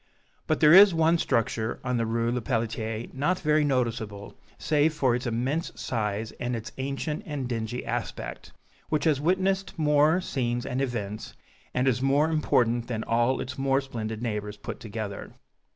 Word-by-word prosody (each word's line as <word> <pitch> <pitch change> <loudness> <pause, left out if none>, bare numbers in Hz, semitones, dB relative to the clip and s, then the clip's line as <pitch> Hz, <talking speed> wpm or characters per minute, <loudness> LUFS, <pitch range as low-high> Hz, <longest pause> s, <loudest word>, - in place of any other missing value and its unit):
But - - 0
there 150 +1 +7
is 195 -1 +9
one 165 +1 +3
structure 115 -4 0
on 125 -1 0
the 115 -1 0
Rue 115 +1 0
Lepelletier 115 -2 -2
not 150 +8 +1
very 155 -2 +2
noticeable 115 -7 -2 0.2
save 155 +1 +2
for 130 -4 +2
its 125 +1 -2
immense 130 +8 -1
size 110 -2 -2
and 120 0 -2
its 115 +2 -6
ancient 140 +4 -3
and 145 -5 -3
dingy 120 0 -3
aspect, - - -5 0.4
which 150 -2 0
has 150 -4 +2
witnessed 190 +3 0
more 150 +2 +4
scenes 120 -7 -2
and 125 +2 -2
events, 110 -6 -4 0.4
and 125 +1 0
is 125 -1 +2
more 140 +4 +3
important 120 -6 +2
than 110 -3 -3
all 120 +3 +1
its 130 +1 -5
more 135 0 +2
splendid 110 -4 -5
neighbors 105 -2 -3
put - - -7
together. 105 -2 -6
125 Hz, 160 wpm, -27 LUFS, 115-150 Hz, 0.4 s, is